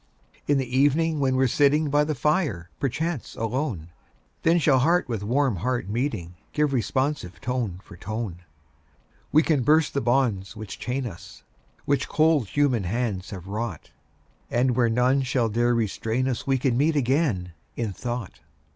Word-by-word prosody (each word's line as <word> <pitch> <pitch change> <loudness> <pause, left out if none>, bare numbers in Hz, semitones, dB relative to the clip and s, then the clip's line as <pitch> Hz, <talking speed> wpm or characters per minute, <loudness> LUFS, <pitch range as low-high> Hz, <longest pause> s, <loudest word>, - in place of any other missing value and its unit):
In 145 - +3
the 130 -2 -2
evening, 150 +3 +3
when 130 -2 +2
we're 130 +1 +3
sitting 145 +3 +3
By 145 +1 +4
the 150 0 -2
fire, 125 - 0
perchance 150 +2 -2
alone, 115 - -2 0.5
Then 165 +1 +4
shall 145 -5 +4
heart 170 +6 +2
with 115 -5 -3
warm 125 +1 +1
heart 120 +1 -1
meeting, 110 - -2 0.2
Give 150 -2 +1
responsive 130 -5 -1
tone 120 -8 -2
for 100 - -13
tone. 110 -2 -5 0.9
We 155 +2 +5
can 155 -5 +2
burst 155 +4 +3
the 140 - 0
bonds 115 -5 +1
which 110 -2 -8
chain 130 +1 -2
us, 100 -8 -9 0.4
Which 140 0 0
cold 155 -7 +3
human 130 -5 +1
hands 105 -2 -2
have 95 -4 -8
wrought, 100 -5 -5 0.6
And 125 +1 +2
where 120 -2 +3
none 125 +4 +3
shall 125 -3 0
dare 120 +2 +2
restrain 115 +3 -1
us 125 -1 -3
We 135 -1 +3
can 130 -1 +1
meet 155 +2 +2
again, 125 - +1 0.2
in 115 -4 -2
thought. 120 -1 -5
125 Hz, 160 wpm, -25 LUFS, 110-145 Hz, 0.9 s, We